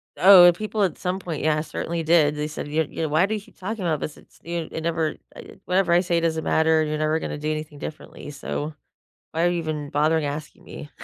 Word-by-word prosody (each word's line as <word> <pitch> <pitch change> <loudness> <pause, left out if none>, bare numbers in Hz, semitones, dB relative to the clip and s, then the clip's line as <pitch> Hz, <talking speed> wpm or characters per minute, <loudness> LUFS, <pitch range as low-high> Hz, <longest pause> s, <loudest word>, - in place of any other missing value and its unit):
Oh, 180 -2 +9
people 215 +3 -2
at 185 - 0
some 185 +1 -2
point, 170 -6 -5
yeah, 155 -1 +2
certainly 165 +1 -4
did. 155 -2 +4
They 150 0 -2
said, 150 - -6
you're 155 +2 0
yeah, 160 - -4
“Why 155 +4 +3
do 215 +2 -2
you 210 - -5
keep - - -21
talking 205 +2 -5
about 160 -4 0
this? 155 - -5
It's - - -20
you 170 -1 -4
it 160 - -4
never 160 -1 -1 0.2
I - - -12
whatever 180 -1 +1
I 175 - +6
say 175 -2 +1
doesn't 160 -1 -1
matter, 160 0 +3
you're 155 0 -2
never 155 +1 +1
gonna - - -4
do 150 +1 -2
anything 155 -1 -5
differently, 150 0 -8
so, 145 +1 -4 0.6
why 165 +1 0
are - - +4
you 175 -1 -1
even 155 -3 -4
bothering 155 +1 +2
asking 150 +2 -6
me?” 145 - -9
160 Hz, 235 wpm, -24 LUFS, 150-175 Hz, 0.6 s, Oh